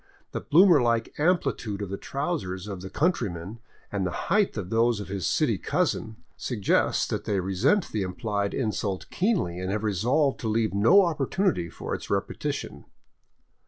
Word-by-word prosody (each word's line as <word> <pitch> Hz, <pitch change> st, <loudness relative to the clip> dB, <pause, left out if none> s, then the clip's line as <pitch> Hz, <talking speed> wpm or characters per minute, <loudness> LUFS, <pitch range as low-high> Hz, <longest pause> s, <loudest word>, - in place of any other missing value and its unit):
The -, -, -4 dB
bloomer 170 Hz, -2 st, +6 dB
like 115 Hz, -1 st, +1 dB
amplitude 150 Hz, -, 0 dB
of 95 Hz, -, -6 dB
the -, -, -1 dB
trousers 105 Hz, -, -3 dB
of 100 Hz, -3 st, -6 dB
the 95 Hz, -, -7 dB
coun 165 Hz, -, +3 dB
tryman, 100 Hz, -, -5 dB, 0.3 s
and 100 Hz, -2 st, -1 dB
the 90 Hz, -, 0 dB, 0.2 s
height 205 Hz, -, +2 dB
of 95 Hz, -3 st, -5 dB
those 115 Hz, 0 st, +2 dB
of 100 Hz, -, -7 dB
his 95 Hz, -4 st, -2 dB
city -, -, +1 dB
cousin, 110 Hz, -1 st, -1 dB, 0.2 s
suggests 110 Hz, -6 st, +1 dB
that -, -, -3 dB
they 100 Hz, -2 st, 0 dB
resent 100 Hz, -, +1 dB
the 105 Hz, -, -1 dB
implied 100 Hz, +2 st, -2 dB
insult 105 Hz, -5 st, -2 dB
keenly, 175 Hz, -, 0 dB
and 95 Hz, 0 st, -3 dB
have 105 Hz, +1 st, -2 dB
resolved 125 Hz, -, +1 dB
to 115 Hz, -, -3 dB
leave 110 Hz, -2 st, +1 dB
no 160 Hz, -, +6 dB
opportunity 160 Hz, -, 0 dB
for -, -, -6 dB
its -, -, -5 dB
repetition. -, -, -3 dB
110 Hz, 165 wpm, -26 LUFS, 95-145 Hz, 0.3 s, bloomer